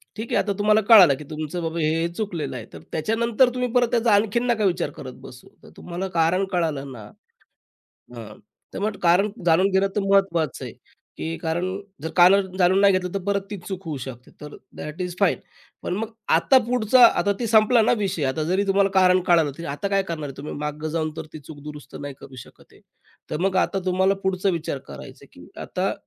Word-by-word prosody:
ठीक 220 +2 -6
आहे - - +3
आता 205 - -2
तुम्हाला 215 +1 +3
कळालं 190 -10 +9
की 150 - -9
तुमचं 155 +2 -5
बाबा 165 +1 -3
हे-हे 160 +2 +1
चुकलेलं 175 -9 -4
आहे 115 -3 -7
तर 80 - -9
त्याच्यानंतर 230 +8 +1
तुम्ही 250 -1 -2
परत 245 -1 +3
त्याचा 235 -2 +2
आणखीन 215 +4 +2
नका 220 -3 +1
विचार 175 -4 0
करत 130 -3 -9
बसू. 125 -1 -13 0.2
तर - - -14
तुम्हाला 180 +2 -5
कारण 170 +4 +2
कळालं 155 -6 -2
ना, 110 -5 -11 1.1
हां. 110 -2 -10 0.4
तर - - -5
मग 210 +1 -2
कारण 180 +4 +3
जाणून 175 +3 +4
घेणं 190 +1 +2
तर 205 - +1
महत्वाचं 170 -7 +1
आहे. - - -8 0.4
की 165 +1 -4
कारण 165 +2 -2 0.4
जर 160 - -3
कारण 190 +1 +5
जाणून 185 +1 +3
नाही 200 -1 +5
घेतलं 180 -1 -2
तर 195 - -1
परत 200 0 0
ती 205 - -4
चूक 190 -1 -6
होऊ 155 -3 -4
शकते. 125 -1 -9
तर 150 0 -9 0.2
दॅट 150 +4 -7
इज 180 -1 -4
फाईन. 200 -4 +3 0.5
पण 180 - -2
मग 220 +3 -3 0.3
आता 265 - +4
पुढचा 245 0 +4
आता 205 - 0
ते 235 - -2
संपला 225 +2 +4
ना 220 - +3
विषय 190 -6 -2
आता 135 +4 -1
जरी 185 +5 0
तुम्हाला 195 0 +3
कारण 185 -1 +4
कळालं 165 -5 +3
तर 170 - -7
आता 200 +7 -3
काय 195 0 +1
करणार 165 -5 -5
आहे 135 - -11
तुम्ही 145 +2 -7
माग 150 +1 -5
जावून 155 0 -2
तर 160 - -5
ती 155 - -8
चूक 145 +1 -12
दुरुस्त 150 0 -10
नाही 145 -1 -6
करू 135 -1 -13
शकत - - -20
आहे. - - -21 0.5
तर - - -3
मग 190 0 0
आता 195 - +1
तुम्हाला 190 +1 +2
पुढचा 190 0 0
विचार 165 -5 -3
करायचा - - -11
आहे - - -22
की - - -13
आता - - -2
180 Hz, 210 wpm, -23 LUFS, 155-200 Hz, 1.1 s, कळालं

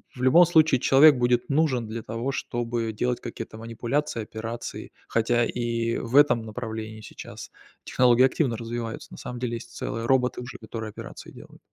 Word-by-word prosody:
в 125 - -8
любом 165 +8 +7
случае, 160 -5 +4
человек 140 +3 +7
будет 120 +1 +1
нужен 140 -6 +1
для 115 +1 -5
того, 115 +5 -3
чтобы 120 -3 -2
делать 125 +3 -1
какие-то 110 -1 -7
манипуляции, 115 +3 -2
операции. 115 +2 -6 0.2
Хотя, 115 +1 +2
и 115 -1 -1
в 120 +2 -4
этом 145 -5 +5
направлении, 110 -1 -6
сейчас, - - -10 0.3
технологии 125 0 +4
активно 130 -2 +1
развиваются. 115 -1 -5
На - - -10
самом 125 0 -7
деле, 120 -1 -2
есть 115 0 -9
целые 115 -2 -4
роботы 125 0 +2
уже, 125 - -8
которые 110 0 -6
операции - - -10
делают. - - -14
120 Hz, 165 wpm, -26 LUFS, 115-130 Hz, 0.3 s, любом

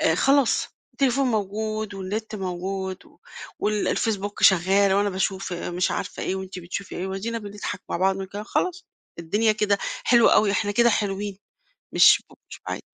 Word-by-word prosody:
آآ، 160 - +3
خلاص 275 - +3 0.2
التليفون 270 0 +1
موجود 215 -1 -2
والنت 210 +3 -4
موجود 190 0 -4
و - - -23 0.4
وال 210 0 0
الFacebook 205 -3 -1
شغّال 190 +2 +5
وأنا 205 +1 +2
باشوف 190 0 -2
مش 175 +1 -1
عارفة - - -4
إيه 190 - -1
وأنتِ 190 -1 -6
بتشوفي 180 +2 -6
إيه، 180 - -3
وأدينا 200 +5 -3
بنضحك 205 -2 -6
مع - - 0
بعض 190 +2 +2
ونتكلم 195 +2 -6
خلاص، 365 +9 -2 0.3
الدنيا 210 +7 +1
كده 210 -1 +1 0.3
حلو 240 -2 +6
أوي، 210 - +4
إحنا 205 +1 0
كده 235 +3 +4
حلوين. 205 -2 -2 0.6
مش - - +6
ب - - -17 0.2
مش - - -10
بُعاد. - - -4
200 Hz, 160 wpm, -24 LUFS, 190-215 Hz, 0.6 s, حلو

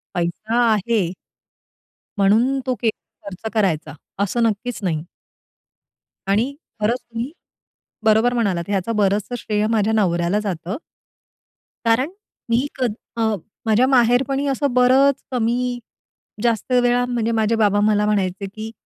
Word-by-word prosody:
पैसा 180 +7 -1 0.2
आहे 215 +1 +1 1.2
म्हणून 225 +7 +3
तो 255 -1 0
के 230 - +3
खर्च 200 -1 -9
करायचा 165 -9 0 0.3
असं 235 +4 0
नक्कीच 230 +2 -1
नाही. 160 -5 -1 1.2
आणि 220 +8 +1 0.3
खरंच 235 +4 +1
तुम्ही 235 +3 -6 0.7
बरोबर 220 +3 +4
म्हणालात 200 -8 0
ह्याचं 200 +2 -1
बरंचसं 205 +3 +1
श्रेय 210 -1 -1
माझ्या 220 -1 +2
नवऱ्याला 180 -2 +1
जातं. 190 0 -4 1.1
कारण 230 +6 +3 0.4
मी 235 +4 +2
क 255 - +2 0.3
अ, 220 -2 +1 0.3
माझ्या 225 +3 +4
माहेरपणी 260 +2 +3
असं 275 -1 0
बरंच 255 +2 +4
कमी-जास्त 240 -1 -3
वेळा 245 0 +2
म्हणजे 235 -2 -1
माझे 220 +1 +2
बाबा 205 -2 +3
मला 210 0 +2
म्हणायचे 200 -2 0
की, 215 +3 -7
225 Hz, 120 wpm, -21 LUFS, 205-245 Hz, 1.2 s, बरोबर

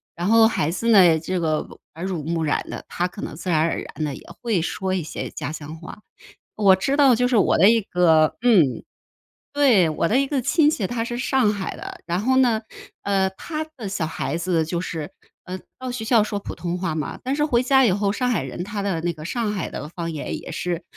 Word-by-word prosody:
然 175 +2 -2
后 225 +1 +6
孩 160 -8 0
子 230 +6 -3
呢， 180 -7 +6
这 180 +3 -2
个 155 -2 -1 0.3
耳 165 - -8
濡 180 -5 -3
目 165 +1 -1
染 150 - -1
的， - - -6
他 175 - -1
可 190 +3 -10
能 - - -6
自 175 +4 -6
然 160 - +3
而 165 +1 +1
然 - - -9
地 145 -2 -3
也 - - -13 0.2
会 230 -6 +1
说 185 +3 -2
一 180 - -2
些 155 - -5
家 - - -5
乡 155 0 -7
话。 170 +5 -10 0.6
我 200 -3 +5
知 270 +9 -1
道 275 -4 +5
就 250 +2 +2
是 250 -2 +2
我 200 - +3
的 190 +5 +7
一 230 -1 +3
个 165 -5 +3
嗯， 195 - +3 0.7
对， 250 - +4
我 155 +2 0
的 250 +9 +3
一 275 - +1
个 275 -2 -1
亲 300 +3 +4
戚， 220 -10 -2
他 235 +1 -2
是 240 +1 -4
上 255 -3 +2
海 195 -2 -4
的。 - - -9
然 175 +1 -1
后 260 +4 +2
呢， 240 -4 +3 0.4
呃， 195 -1 +1
他 310 - -5
的 220 -6 -5
小 185 -4 -2
孩 155 -1 -3
子 170 -1 0
就 170 +2 -3
是， 165 -3 -5 0.4
呃， 185 0 -6 0.2
到 255 0 -5
学 245 -3 -5
校 225 -2 +4
说 210 -1 -3
普 - - -7
通 175 0 -4
话 180 -3 -2
嘛， 155 -1 -4
但 265 +2 -1
是 295 0 +1
回 245 -5 +2
家 265 +1 +4
以 220 - +4
后， 200 +1 +1
上 250 +4 -1
海 210 - 0
人 135 +6 -5
他 205 +1 -4
的 190 -5 -1
那 175 +1 0
个 155 -1 -10
上 220 +3 -2
海 190 -5 -4
的 150 - -6
方 170 0 -5
言 155 -3 -4
也 - - -9
是， 175 -1 -3
190 Hz, 260 characters per minute, -23 LUFS, 165-235 Hz, 0.7 s, 的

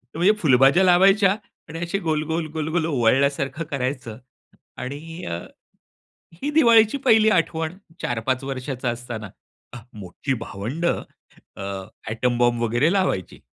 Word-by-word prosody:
म्हणजे 180 +5 +4
फुलभाज्या 135 +4 +5
लावायच्या 195 +2 +5 0.4
आणि 165 +1 -6
अशी 175 +3 -2
गोल-गोल, 160 -1 -1
गोल-गोल 160 +1 -1
ओवळल्यासारखं 140 +3 +1
करायचं 125 -4 -3 0.6
आणि 155 +6 -7
अ, 85 0 -3 1.0
ही 275 - -4
दिवाळीची 235 -5 +5
पहिली 220 -2 +6
आठवण 165 -1 0 0.3
4-5 125 +3 -1
वर्षाचा 130 -2 -3
असताना 120 -3 -6 0.7
मोठी 100 +8 -3
भावंड 115 +13 -4
अ, 95 - -6 0.2
एटॉम 120 +2 0
बॉम्ब 120 -1 +2
वगैरे 120 - +2
लावायची. 185 - -1
145 Hz, 110 wpm, -23 LUFS, 120-175 Hz, 1.0 s, पहिली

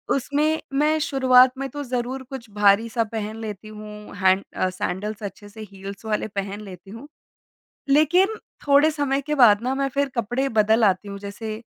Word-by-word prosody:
उसमें 295 +4 0 0.2
मैं 305 +1 +3
शुरुआत 260 -2 +5
में 275 0 -3
तो 290 +3 -6
ज़रूर 255 +1 -3
कुछ 260 -4 -8
भारी 205 +2 +3
सा 230 0 0
पहन 215 -1 -5
लेती 215 -1 -7
हूँ, 210 -1 -10
हैन्ड 190 0 +3
अ, 185 - 0
सैंडल्स 195 +4 -4
अच्छे 205 +1 -8
से 220 +2 -11
हील्स 195 +2 -9
वाले 215 -1 -1
पहन 200 0 -5
लेती 195 -1 -11
हूँ। 230 +7 -10 0.8
लेकिन 340 +9 +4 0.3
थोड़े 285 +2 +5
समय 285 -3 -1
के 300 - 0
बाद 225 -7 +6
ना 255 +2 -1
मैं 275 0 0
फिर 280 +1 -1
कपड़े 245 +3 -1
बदल 220 0 +3
आती 195 0 +1
हूँ, 200 0 -6
जैसे 215 +2 -7
225 Hz, 180 wpm, -23 LUFS, 205-275 Hz, 0.8 s, बाद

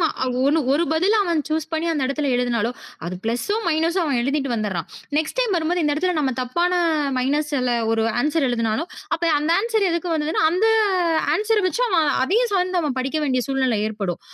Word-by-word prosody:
ம 325 - +3 0.4
1 305 +3 +3
1 325 +4 +2
பதில 375 +7 +2
அவன் 335 -3 +1
சூஸ் 315 0 -2
பண்ணி 320 +1 -1
அந்த 285 -4 -1
இடத்துல 285 0 -1
எழுதனாலோ 240 -1 0 0.3
அது 180 - -4
ப்ளஸ்சும், 405 - -1
மைனஸ்ம் 335 +3 +1
அவன் 275 -5 0
எழுதிட்டு 275 -1 -1
வந்துட்றான். 195 -6 -3 0.3
நெக்ஸ்ட் 315 +10 -3
டைம் 450 -6 +1
வரும்போது 340 +2 0
இந்த 295 -1 +1
இடத்துல 360 +2 0
நாம 265 -3 0
தப்பான 345 +8 0 0.4
மைனஸால 280 -1 0 0.2
ஒரு 225 0 +1 0.2
ஆன்சர் 300 0 +1
எழுதினாலும், 230 +8 -1 0.2
அப்ப 335 - -7 0.2
அந்த 300 +2 -1
ஆன்சர் 440 -4 +1
எதுக்கு 340 +1 -2
வந்தது? 310 0 -2
அந்த 370 +6 +1 0.7
ஆன்சர 430 +1 +1
வச்சு 475 - -2
அவன் 330 -6 +2 0.2
அதையும் 445 - +1
சார்ந்து 365 0 0 0.2
படிக்க 270 +4 -2
வேண்டிய 255 -3 +1
சூழ்நிலை 260 -4 +1
ஏற்படும். 205 -5 -4
310 Hz, 175 wpm, -22 LUFS, 255-355 Hz, 0.7 s, ம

